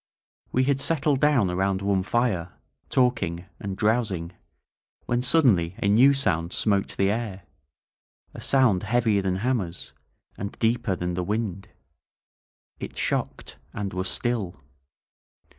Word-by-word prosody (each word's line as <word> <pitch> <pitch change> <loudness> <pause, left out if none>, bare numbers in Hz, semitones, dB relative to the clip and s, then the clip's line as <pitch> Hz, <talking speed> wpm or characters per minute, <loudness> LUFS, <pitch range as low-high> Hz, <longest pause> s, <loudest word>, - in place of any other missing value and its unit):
We 130 - +2
had 135 0 +1
settled 145 -3 +1
down 135 -11 +3
around 95 +1 0
one 100 -1 +2
fire, 95 -5 -1 0.4
talking 115 -9 +1
and 100 -1 -5
drowsing, 105 -6 0 0.7
when 120 0 0
suddenly 120 - +3
a - - -1
new 120 +7 +6
sound 85 -10 0
smote 100 -3 0
the 100 0 +2
air 105 -4 -4 0.4
— - - -75 0.3
a - - -9
sound 125 -9 +3
heavier 110 -1 +2
than 95 -1 -1
hammers, 100 -5 -2 0.5
and 100 +1 -5
deeper 115 -3 +1
than 90 0 -3
the 90 +1 -2
wind. 100 -1 -3 1.1
It - - -7
shocked - - -3
— - - -35
and 100 -3 -3
was 90 0 -2
still. 110 -7 -1
100 Hz, 135 wpm, -25 LUFS, 95-120 Hz, 1.1 s, new